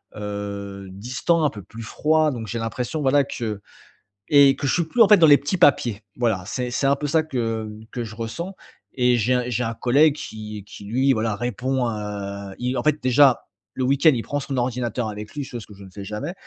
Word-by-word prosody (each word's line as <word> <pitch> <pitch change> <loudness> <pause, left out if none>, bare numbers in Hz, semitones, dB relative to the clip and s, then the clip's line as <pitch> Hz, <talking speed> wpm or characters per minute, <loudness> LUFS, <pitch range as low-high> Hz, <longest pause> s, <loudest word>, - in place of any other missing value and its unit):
heu, 100 -1 -6
distants, 130 - 0
un - - +3
peu 105 -6 -10
plus 110 +5 -11
froid. 155 +7 +1
Donc, 120 -4 -5
j'ai 115 +3 -3
l'impression, 120 +7 -3
voilà, 140 +1 +4
que 110 -6 -5 0.7
et 140 -2 +6
que 140 - -2
je - - +2
suis 175 - +2
plus, 200 +9 0
en 225 - +9
fait, 210 - +8
dans 165 -3 +6
les 145 -1 +8
petits 145 +6 -2
papiers. 120 - +3 0.2
Voilà, 115 -6 0
c'est 125 +4 -3
c'est 130 - -1
un 140 - +4
peu 150 - -3
ça 160 +2 +2
que 115 -7 -3 0.2
que 120 - -4
je 110 0 -9
ressens, 170 - -5 0.4
et 125 -1 +3
j'ai 120 +3 +1
un 125 0 +1
j'ai 125 0 -1
un 115 -1 -2
collègue 140 +6 +3
qui 105 -6 -7
qui 100 - -11
lui, 130 +6 +2
voilà, 110 -2 -1
répond, 125 +3 -1
heu 100 -2 -5
il 125 +1 -1
en 120 - -1
fait, 150 0 +1
déjà, 130 +1 +4 0.3
le 130 - -2
week-end, 140 +5 +4
il 115 -3 -2
prend 145 - -2
son 135 -1 -4
ordinateur 120 -1 -1
avec 105 0 -8
lui, 145 - -3
chose 120 -4 -7
que 105 - -13
je 100 - -13
ne - - -13
fais 100 +1 -8
jamais, 105 - -5
125 Hz, 225 wpm, -23 LUFS, 105-140 Hz, 0.7 s, en